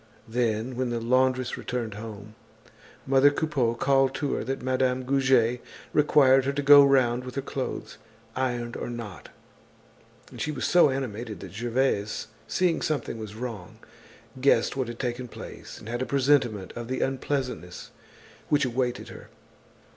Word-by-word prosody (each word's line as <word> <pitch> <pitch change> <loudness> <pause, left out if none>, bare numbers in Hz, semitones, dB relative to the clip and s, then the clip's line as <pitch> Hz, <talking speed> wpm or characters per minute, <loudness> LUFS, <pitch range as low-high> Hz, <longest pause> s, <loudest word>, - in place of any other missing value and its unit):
Then, 115 +1 -1
when 130 0 -1
the 120 -1 -2
laundress 130 +1 +1
returned 120 -4 -4
home, 105 -1 -9 0.7
mother 135 +1 +5
Coupeau 145 -6 0
called 135 +1 +2
to 145 0 -1
her - - -2
that 135 +2 -4
Madame 130 0 +1
Goujet 130 -3 +2 0.3
required 135 -3 +5
her 140 - 0
to 145 - -1
go 145 0 +9
round 130 -3 +3
with 125 0 -8
her 135 - -1
clothes, 135 -1 -5 0.4
ironed 120 -2 -2
or - - -4
not; 115 -6 -7 1.0
and - - -8
she 155 - -1
was - - -3
so 175 -4 +5
animated 120 -6 -4
that - - -9
Gervaise, 115 -2 -1 0.2
seeing 175 +7 +1
something 140 -6 -2
was 110 -1 -7
wrong, 110 -7 -7 0.6
guessed 140 - +3
what 130 -3 -1
had 120 0 -7
taken 125 0 -3
place - - -10
and - - -12
had 120 +2 -3
a 130 - -2
presentiment 130 -8 +1
of 120 -1 -6
the 130 +1 -2
unpleasantness 130 - -3 0.6
which 145 -2 +3
awaited 125 0 -2
her. - - -12
125 Hz, 155 wpm, -26 LUFS, 115-135 Hz, 1.0 s, go